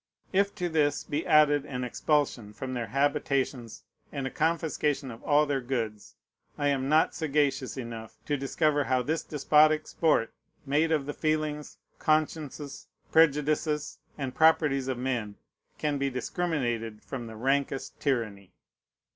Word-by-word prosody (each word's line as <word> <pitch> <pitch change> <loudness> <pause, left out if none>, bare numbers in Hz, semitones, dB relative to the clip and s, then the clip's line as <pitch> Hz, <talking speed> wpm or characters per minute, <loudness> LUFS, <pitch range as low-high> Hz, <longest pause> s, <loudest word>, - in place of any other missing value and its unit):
If 200 +1 +2
to 180 -4 -1
this 150 -3 +1
be 150 +3 -3
added 150 -2 +5
an 125 -3 -4
expulsion 125 -4 0
from 130 +4 -5
their 120 -2 -3
habitations 135 -2 -1 0.3
and 140 -1 -4
a 135 - -3
confiscation 150 -4 0
of 115 - -11
all 150 0 +3
their 140 -2 -1
goods, 115 -5 -4 0.4
I 145 0 +1
am 135 -1 0
not 155 +1 +4
sagacious 140 -4 0
enough 115 -3 -7
to 145 - 0
discover 145 +1 +1
how 130 -1 +1
this 160 +4 -1
despotic 155 +1 +3
sport 150 -9 +1 0.3
made 150 +4 +2
of 150 -4 +1
the 145 - -4
feelings, 155 -1 -2 0.2
consciences, 155 -2 -1 0.2
prejudices, 150 -1 +2 0.2
and 135 -3 -3
properties 150 -4 +3
of 130 -2 -1
men 120 -5 -2 0.4
can 145 -2 -1
be 140 0 +1
discriminated 125 - -2
from 120 +4 -6
the 110 - -9
rankest 135 +3 -1
tyranny. 110 -9 -2
140 Hz, 140 wpm, -28 LUFS, 130-150 Hz, 0.4 s, added